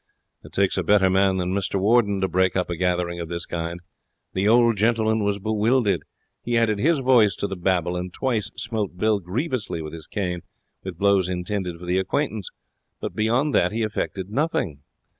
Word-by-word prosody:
It - - -13
takes 95 -1 +1
a - - 0
better 95 +1 +4
man 95 0 +3
than 90 0 -1
Mr 100 0 -1
Warden 100 -1 +3
to 95 - +2
break 95 0 +1
up 90 -1 0
a - - -1
gathering 90 0 -1
of 85 -1 -5
this 85 0 -3
kind. 85 +1 -4 0.5
The 95 +2 +1
old 115 0 +5
gentleman 110 0 +2
was 100 0 0
bewildered. 110 +2 +1 0.4
He 120 0 0
added 110 -3 +2
his 160 +7 +3
voice 125 -6 +4
to - - -3
the 95 - -3
babel, 90 -1 0
and 90 0 -4
twice 115 -2 -1
smote 105 -5 -3
Bill 110 +1 +2
grievously 105 - -3
with 75 -1 -6
his 80 -1 -9
cane 90 -4 -3 0.4
with 95 -3 -6
blows 100 -1 +3
intended 90 -1 -3
for 90 - -10
the 90 +2 +1
acquaintance, 105 - -2 0.5
but - - -4
beyond 120 +7 +1
that 90 - +3
he 115 +1 -1
effected 100 -2 -3
nothing. 110 - -1
100 Hz, 190 wpm, -24 LUFS, 90-110 Hz, 0.5 s, old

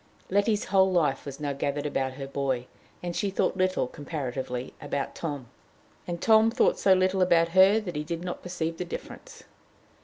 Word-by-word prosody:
Letty's 205 +2 +2
whole 190 0 +3
life 150 -6 +1
was 140 +1 -7
now 145 -1 -2
gathered 140 +1 -2
about 135 -2 -1
her 135 +1 -6
boy, 135 -3 -2 0.4
and 175 -1 -3
she 200 - 0
thought 195 - 0
little, 185 -5 +1
comparatively, 130 -3 -5
about 140 -2 -3
Tom. 145 -6 -5 0.6
And 170 -1 -3
Tom 220 +2 +5
thought 235 +2 +2
so 195 - +5
little 185 0 +2
about 170 -2 +4
her 190 +4 +6
that 180 -6 -6
he 150 - -2
did 165 +2 -4
not 180 - -5
perceive 165 -2 -3
the 180 - -2
difference. 175 - -9
165 Hz, 180 wpm, -27 LUFS, 140-185 Hz, 0.6 s, her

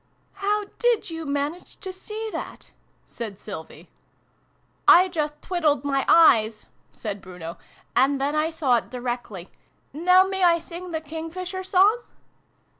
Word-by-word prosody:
" - - -41 0.2
How 420 0 +1
did 480 -7 +1
you 325 -1 -6
manage 290 +5 -3
to 380 -2 -6
see 430 +4 -6
that? - - -7 0.2
" - - -40
said 215 -4 -7
Sylvie. 190 -7 -9 0.5
" - - -41
I 365 +2 +4
just 300 -4 -3
twiddled 305 -7 +1
my 275 -1 0
eyes," 220 -10 +5 0.3
said 205 -2 -6
Bruno, 180 -3 -9 0.2
" - - -31
and 275 +2 +3
then 280 +2 0
I 305 +1 +1
saw 290 -7 +2
it - - -5
directly. 240 -7 -5 0.4
Now 365 +5 +5
may 385 0 -2
I 340 -1 +6
sing 345 +2 -8
the 320 -2 -3
King 320 +1 -6
fisher 370 +2 -5
Song 390 +5 +4
320 Hz, 160 wpm, -24 LUFS, 250-365 Hz, 0.5 s, I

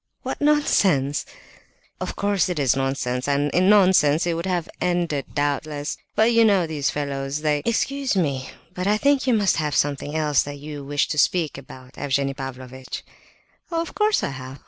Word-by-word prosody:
"What - - -4
nonsense!" 195 - +2 0.7
"Of - - -4
course 200 -3 +1
it 180 - -2
is 135 -4 +2
nonsense, 135 -1 -2
and 145 +1 +1
in 185 +2 +3
nonsense 180 -7 +5
it 170 - 0
would 170 +3 -3
have 175 -2 -1
ended, 175 -6 0
doubtless; 145 +1 -2 0.2
but 220 +2 +4
you 230 0 +5
know 200 -5 +4
these 150 -3 -1
fellows, 140 0 -3
they—" 150 -1 +1
"Excuse 270 +2 0
me, 140 -8 -1 0.2
but 185 0 -3
I 210 +1 +3
think 280 +2 +2
you 250 - +4
must 205 -3 +2
have 150 -3 -1
something 145 +1 0
else 150 -3 +2
that 145 0 -6
you 145 0 -8
wished 145 +1 -1
to 150 - 0
speak 165 -3 +2
about, 130 -1 -12
Evgenie 140 -1 0
Pavlovitch?" 130 -1 -7 0.7
"Of 335 -1 -3
course, 425 0 +2
I - - 0
have!" 130 0 -8
150 Hz, 175 wpm, -23 LUFS, 140-190 Hz, 0.7 s, nonsense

